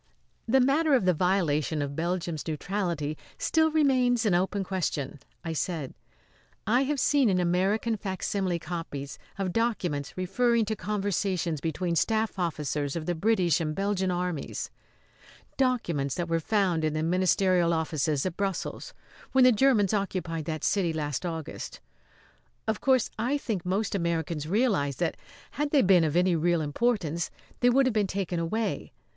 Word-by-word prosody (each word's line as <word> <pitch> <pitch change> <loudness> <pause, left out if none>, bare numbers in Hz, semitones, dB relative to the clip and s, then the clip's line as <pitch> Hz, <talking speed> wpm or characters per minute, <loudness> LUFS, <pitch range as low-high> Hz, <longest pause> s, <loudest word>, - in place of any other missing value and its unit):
"The 265 +4 +4
matter 280 +3 +3
of 245 - +2
the 180 - +4
violation 160 -4 +1
of 140 0 -5
Belgium's 170 -1 -2
neutrality 160 -2 -2 0.2
still 320 0 +2
remains 255 -6 +3
an 205 - +3
open 190 +3 +1
question," 165 -7 -3 0.3
I 165 - -2
said. 160 -4 -3 0.7
"I 245 +5 +3
have 290 0 -1
seen 275 -3 +3
in 185 -2 +2
American 190 +6 +1
facsimile 190 -2 -2
copies 160 -4 -6 0.2
of 190 -3 -2
documents 185 - -1
referring 230 +5 +2
to 220 +1 -2
conversations 195 -6 -1
between 170 +2 -1
staff 220 +2 0
officers 150 -4 -2
of 165 -2 -3
the 175 - 0
British 180 -2 +2
and 155 -1 -2
Belgian 195 -1 0
armies 180 -3 -3 0.8
documents 175 - 0
that 175 -1 -2
were 165 0 +1
found 180 -2 +1
in 155 -1 +1
the 155 0 -1
ministerial 180 0 +2
offices 155 -3 0
at 185 -3 -2
Brussels 195 -2 -3 0.4
when 265 -1 +6
the 255 - +8
Germans 220 -5 +3
occupied 180 -6 -2
that 155 -1 -4
city 190 -5 +1
last 150 +2 -2
August. 165 -2 -6 0.9
Of 220 -1 -1
course 260 -3 +3
I 255 +6 +1
think 210 -10 -3
most 200 +4 0
Americans 165 -4 -1
realise 190 - +1
that, - - -1 0.4
had 295 0 -1
they 285 -2 +4
been 185 -3 +5
of 155 -1 0
any 180 0 +3
real 170 +1 +2
importance, 170 0 0 0.3
they 245 - +4
would 265 +2 +4
have 255 - +1
been 210 -2 +1
taken 185 -2 -2
away. 215 +7 -2
185 Hz, 155 wpm, -28 LUFS, 165-220 Hz, 0.9 s, the